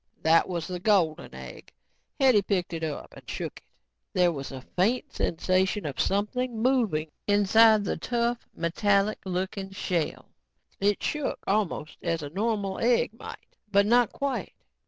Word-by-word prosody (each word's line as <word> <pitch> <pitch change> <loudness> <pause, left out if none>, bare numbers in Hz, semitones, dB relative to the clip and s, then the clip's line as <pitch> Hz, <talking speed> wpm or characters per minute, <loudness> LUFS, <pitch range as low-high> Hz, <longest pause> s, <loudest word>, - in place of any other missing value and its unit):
That 165 +3 +4
was 170 -3 -2
the 180 +1 -5
golden 180 -6 +1
egg. - - -10 0.5
Hetty 260 -6 +5
picked 185 -3 -1
it 165 -1 -4
up 155 -2 -5
and - - -13
shook - - -5
it. - - -36 0.5
There 180 -1 +4
was 140 -4 -6
a 130 -1 -8
faint 245 +10 +1
sensation 185 +3 0
of 140 -3 -5
something 225 +4 -1
moving 220 - +1 0.2
inside 210 +1 +5
the - - -2
tough, 235 +5 -1
metallic 200 +5 +1
looking 190 +1 -3
shell. 180 -4 -2 0.5
It 200 +1 +1
shook 300 -2 -1
almost 195 -6 -1
as 165 -2 -1
a 145 - -6
normal 200 0 -1
egg 235 -2 +2
might, 230 - -11 0.2
but 200 0 +4
not 240 +1 +4
quite. 275 -2 -3
200 Hz, 150 wpm, -27 LUFS, 175-225 Hz, 0.5 s, Hetty